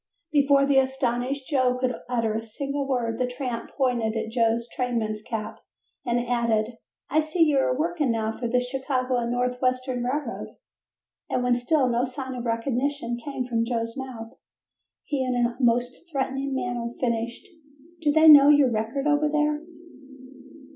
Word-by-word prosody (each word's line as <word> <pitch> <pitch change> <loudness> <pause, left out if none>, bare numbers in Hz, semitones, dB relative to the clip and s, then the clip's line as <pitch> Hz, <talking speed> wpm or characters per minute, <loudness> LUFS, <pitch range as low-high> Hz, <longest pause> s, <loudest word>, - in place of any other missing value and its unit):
Before 280 -2 +4
the 275 -1 +4
astonished 265 0 -1
Joe 255 -4 +2
could 250 0 0 0.2
utter 230 -3 0
a 220 - -2
single 275 +5 -4
word 235 -3 -1
the 250 - +1
tramp 250 -2 -4
pointed 240 -5 +1
at 220 0 -3
Joe's 230 0 +1
trainman's 230 -4 -2
cap 220 0 -5 0.4
and 240 0 0
added: 230 -1 0 0.3
"I 310 - +4
see 315 +2 +2
you 295 -4 +3
are 255 -1 +1
working 315 -2 0
now 220 -1 -1
for 240 - -3
the 250 +2 +2
Chicago 255 -1 -1
& - - -3
North 250 +1 -1
Western 255 -1 0
Railroad," 285 +5 -3 0.7
and 250 - 0
when 250 0 +3
still 260 +3 +2
no 240 +1 +1
sign 260 0 -6
of 245 -1 -5
recognition 240 +1 -1
came 275 -3 -3
from 230 -2 0
Joe's 230 -1 -2
mouth 245 -4 -7 0.7
he 280 -3 -1
in 255 -1 -1
a 240 0 +1
most 245 +1 +2 0.2
threatening 270 -1 -2
manner 240 -2 -2
finished: 235 - -2 0.5
"Do 300 -2 +3
they 315 +2 +5
know 290 -2 +10
your 290 -4 +5
record 225 +5 -2
over 300 0 +2
there?" 300 0 +1
250 Hz, 160 wpm, -25 LUFS, 235-275 Hz, 0.7 s, know